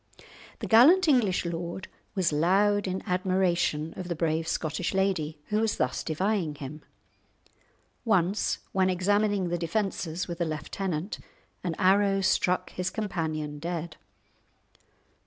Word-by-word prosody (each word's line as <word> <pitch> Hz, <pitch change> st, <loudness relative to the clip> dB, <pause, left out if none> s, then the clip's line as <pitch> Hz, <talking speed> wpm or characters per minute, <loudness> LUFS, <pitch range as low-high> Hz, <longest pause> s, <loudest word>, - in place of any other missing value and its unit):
The -, -, -2 dB
gallant 320 Hz, +12 st, +6 dB
English 225 Hz, -, +3 dB
lord 170 Hz, +2 st, -4 dB, 0.3 s
was 180 Hz, -5 st, +1 dB
loud 195 Hz, +6 st, +3 dB
in 185 Hz, +1 st, -3 dB
admiration 180 Hz, -4 st, 0 dB
of 180 Hz, -, -6 dB
the 170 Hz, -, -2 dB
brave 160 Hz, 0 st, 0 dB
Scottish 165 Hz, +4 st, -2 dB
lady 180 Hz, -6 st, 0 dB
who 210 Hz, +1 st, +1 dB
was 225 Hz, -1 st, 0 dB
thus -, -, -1 dB
defying 180 Hz, -1 st, -1 dB
him. 145 Hz, +1 st, -8 dB, 1.2 s
Once 195 Hz, -3 st, +1 dB
when 190 Hz, -1 st, +2 dB
examining 200 Hz, +1 st, +1 dB
the 175 Hz, 0 st, -1 dB
defences 175 Hz, -2 st, -2 dB
with 170 Hz, -1 st, -5 dB
a -, -, +2 dB
lieutenant, 160 Hz, +3 st, -3 dB, 0.4 s
an 170 Hz, -3 st, -2 dB
arrow 195 Hz, +1 st, +3 dB
struck 185 Hz, -1 st, +1 dB
his 180 Hz, 0 st, -2 dB
companion 155 Hz, -8 st, -3 dB
dead. 170 Hz, 0 st, -4 dB
180 Hz, 125 wpm, -28 LUFS, 165-195 Hz, 1.2 s, gallant